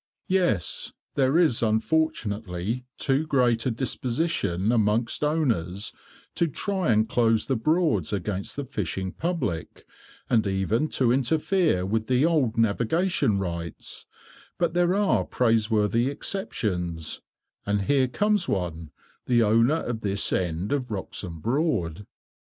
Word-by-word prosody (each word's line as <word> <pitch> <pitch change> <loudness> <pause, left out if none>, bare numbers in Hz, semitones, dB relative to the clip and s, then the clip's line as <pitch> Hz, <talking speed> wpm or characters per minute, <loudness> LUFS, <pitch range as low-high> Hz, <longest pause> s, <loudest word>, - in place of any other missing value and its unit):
"Yes, 175 - 0 0.2
there 135 +2 +2
is 160 -9 +3
unfortunately 110 - -1
too 140 +3 0
great 125 -5 +2
a - - +3
disposition 120 - -1
amongst 115 +2 +1
owners 115 - 0 0.4
to 170 - +1
try 190 - -1
and 110 0 +3
close 115 -1 +2
the 135 - 0
Broads 125 - +1
against 100 0 -3
the 145 - -4
fishing 95 -7 -3
public, 160 - -3 0.4
and 110 -3 +2
even 100 +9 0
to 125 -5 +1
interfere 155 - +1
with 110 +3 -1
the 130 +3 +3
old 145 -9 +1
navigation 115 - +1
rights, 85 -4 -5 0.5
but 170 -2 0
there 175 +1 +2
are 205 -1 +2
praiseworthy 115 0 +2
exceptions, 90 - -3 0.5
and 100 0 +1
here 135 +4 +3
comes 205 +6 +1
one, 85 -4 -2 0.4
the 120 -2 +4
owner 115 +9 +3
of 115 -2 -4
this 100 -1 0
end 90 +2 -1
of 135 -3 -1
Wroxham 95 -4 -4
Broad." 110 - -1
115 Hz, 125 wpm, -26 LUFS, 100-150 Hz, 0.5 s, the